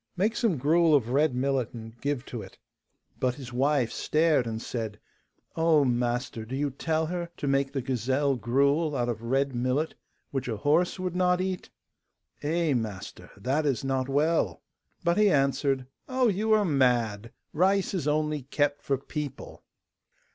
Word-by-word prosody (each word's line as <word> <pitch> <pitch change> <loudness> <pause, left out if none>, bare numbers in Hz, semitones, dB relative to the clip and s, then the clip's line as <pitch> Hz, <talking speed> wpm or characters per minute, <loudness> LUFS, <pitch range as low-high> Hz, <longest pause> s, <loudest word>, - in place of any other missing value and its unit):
Make 215 +5 +1
some 220 -11 +1
gruel 160 +4 +4
of 120 -5 +1
red 145 0 +2
millet, 130 -2 0
and 115 0 -9
give 140 -2 -2
to 120 - -6
it.' 95 - -12 0.6
But 125 -1 +1
his 130 -3 -9
wife 135 -1 +2
stared 155 -5 +2
and 110 -1 -3
said: 110 -3 -5 0.6
'Oh, 160 -3 +4
master, 120 -2 -1
do 120 +4 -6
you 140 +1 -1
tell 160 +4 -1
her 170 +1 -3
to 145 - -3
make 135 0 +1
the 135 -3 -3
gazelle 130 +3 +1
gruel 140 +6 +1
out 120 -2 0
of 115 -2 -3
red 135 +3 0
millet, 130 +6 0 0.4
which 135 -2 -2
a 110 -3 -2
horse 155 - +2
would 185 -1 -3
not 180 0 +3
eat? 185 -1 -3 0.7
Eh, 160 0 +1
master, 110 -6 -4
that 135 +9 0
is 135 -4 0
not 135 0 -1
well.' 155 +4 +1 0.4
But 170 +4 +2
he 210 -1 +5
answered, 135 -3 +1 0.2
'Oh, 255 -2 +3
you 215 +3 0
are 215 -1 +4
mad! 120 - +1 0.2
Rice 190 +4 +2
is 175 -7 -2
only 150 0 0
kept 145 +2 0
for 135 - 0
people. 145 +1 -7
140 Hz, 165 wpm, -27 LUFS, 125-160 Hz, 0.7 s, he